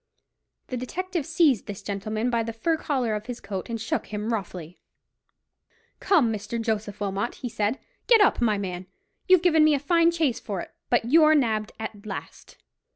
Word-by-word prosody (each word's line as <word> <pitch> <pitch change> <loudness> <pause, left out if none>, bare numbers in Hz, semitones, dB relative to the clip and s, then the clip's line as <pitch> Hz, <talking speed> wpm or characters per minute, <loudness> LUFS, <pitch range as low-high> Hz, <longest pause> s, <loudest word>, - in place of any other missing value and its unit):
The 255 - -3
detective 340 +5 -4
seized 315 - +2
this 205 -1 -7
gentleman 215 +4 -2
by 235 -1 +1
the 230 0 -4
fur 320 +9 0
collar 260 -7 -1
of 210 +1 -4
his 245 -1 -5
coat 200 0 -6
and 230 -1 -3
shook 225 0 -2
him 215 +2 -3
roughly. 180 -5 -6 1.2
"Come, 290 - +3
Mr. 215 +2 -4
Joseph 215 -2 -2
Wilmot," 200 +3 -2
he 245 - -5
said; 215 +3 -1 0.3
"get 465 -2 +7
up, 410 -10 +4
my 215 -3 +2
man. 185 -2 -5 0.4
You've 370 -2 +6
given 320 -3 +5
me 305 -1 +5
a - - -1
fine 335 +4 +3
chase 320 -8 0
for 200 -4 -5
it; - - -8 0.2
but 240 -2 +2
you're 310 +4 +6
nabbed 220 -6 0
at 220 -2 -6
last." 205 -3 -8
230 Hz, 180 wpm, -25 LUFS, 210-305 Hz, 1.2 s, get